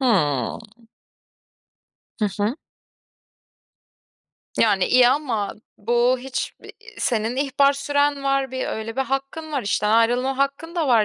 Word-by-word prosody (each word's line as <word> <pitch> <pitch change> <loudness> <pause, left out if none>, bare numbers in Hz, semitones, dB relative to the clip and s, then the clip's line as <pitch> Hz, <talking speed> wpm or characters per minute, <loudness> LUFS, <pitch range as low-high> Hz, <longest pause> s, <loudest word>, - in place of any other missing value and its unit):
Hımm. 150 - +1 1.6
Hı 210 - +3 0.2
hı. 215 +4 +1 2.1
Yani 200 -4 +4
iyi 250 -1 +6
ama 245 -8 -1 0.2
bu 240 +4 +2
hiç, 260 +1 -4
ııı, - - -9 0.3
senin 230 +1 0
ihbar 275 0 +3
süren 285 0 0
var, 275 -1 0
bir 260 0 -3
öyle 220 +1 -5
bir - - +1
hakkın 275 +4 -4
var, 275 -3 -1
işten 210 +1 0
ayrılma 245 +4 +2
hakkın 280 +5 -1
da 325 -5 0
var 230 -4 +5
255 Hz, 125 wpm, -22 LUFS, 225-275 Hz, 2.1 s, iyi